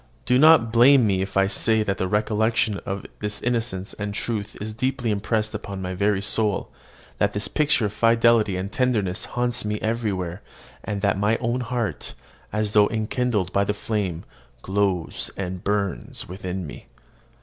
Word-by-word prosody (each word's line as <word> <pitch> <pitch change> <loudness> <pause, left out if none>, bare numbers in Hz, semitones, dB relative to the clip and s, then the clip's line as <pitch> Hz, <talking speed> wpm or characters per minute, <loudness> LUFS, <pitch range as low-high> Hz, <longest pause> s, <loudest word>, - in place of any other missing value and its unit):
Do 125 +1 +3
not 155 -7 +6
blame 125 +2 +7
me 95 -3 +1
if 95 0 -3
I 95 - +5
say 110 +2 +2
that 100 -2 -2
the 95 - 0
recollection 110 +1 +1
of 95 0 -4
this 105 0 -3
innocence 115 -6 -2
and 105 -1 -5
truth 105 -3 -3
is 110 +1 -5
deeply 125 0 -1
impressed 110 +1 -1
upon 100 -2 -5
my 90 0 -3
very 100 +1 +1
soul; 105 -1 0 0.5
that 100 0 +2
this 100 +1 -1
picture 145 -7 +2
of 105 - -3
fidelity 115 -2 +3
and 95 +2 -4
tenderness 110 -8 0
haunts 120 -1 0
me 105 0 -2
everywhere; 105 -5 -2 0.4
and 100 -2 -3
that 100 -1 +1
my 105 +3 +2
own 120 0 -1
heart, 120 -2 -3 0.4
as 105 0 -1
though 105 -1 +6
enkindled 110 -3 -1
by 100 - +3
the 105 +1 -1
flame, 100 -6 -2 0.4
glows 95 -3 -1
and 95 -1 -4
burns 100 -3 -2
within 90 0 -5
me. 75 - -10
105 Hz, 165 wpm, -24 LUFS, 100-115 Hz, 0.5 s, blame